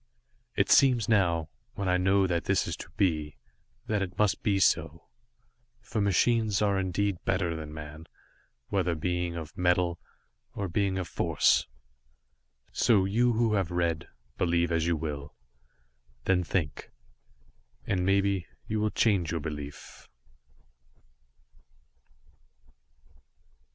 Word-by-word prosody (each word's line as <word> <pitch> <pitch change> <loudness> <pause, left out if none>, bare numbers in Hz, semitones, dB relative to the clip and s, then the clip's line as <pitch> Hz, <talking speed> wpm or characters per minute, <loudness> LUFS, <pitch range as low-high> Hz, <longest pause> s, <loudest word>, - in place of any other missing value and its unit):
It - - +1
seems 125 -5 +5
now, 85 -7 +2 0.3
when 100 - -3
I 90 0 +3
know 95 +1 +3
this 85 -2 0 0.2
that - - -7
is - - -3
to - - -9
be, 75 -6 0 0.5
that 105 -2 -1
it 95 -1 -4
must 105 -2 +2
be 100 -2 +1
so, 80 -3 +1 0.8
for 110 -1 -3
machines 105 +2 +2
are 100 -2 +2
indeed 95 0 -1
better 90 -4 0
than 80 -1 -7
man, 75 +1 -9 0.6
whether 90 -4 0
being 90 +1 -2
of 80 -3 -7
Metal, 90 -1 +1 0.6
or 100 - -2
being 95 +1 0
of 90 -2 -3
Force. - - +2 1.0
So, 110 -5 +3
you 120 +5 +2
who 115 -1 +1
have 95 -5 0
read, 85 -3 -1 0.3
believe 85 -1 +1
as 85 0 +1
you 85 -2 +1
will. 75 -2 -5 0.9
Then 90 -1 +2
think 80 -4 -3 1.0
and 90 -2 0
maybe, 95 -1 +1 0.2
you 110 0 -2
will 105 0 +1
change 100 -7 +1
your 85 0 -1
belief. 75 -1 -8
90 Hz, 125 wpm, -28 LUFS, 85-100 Hz, 1.0 s, seems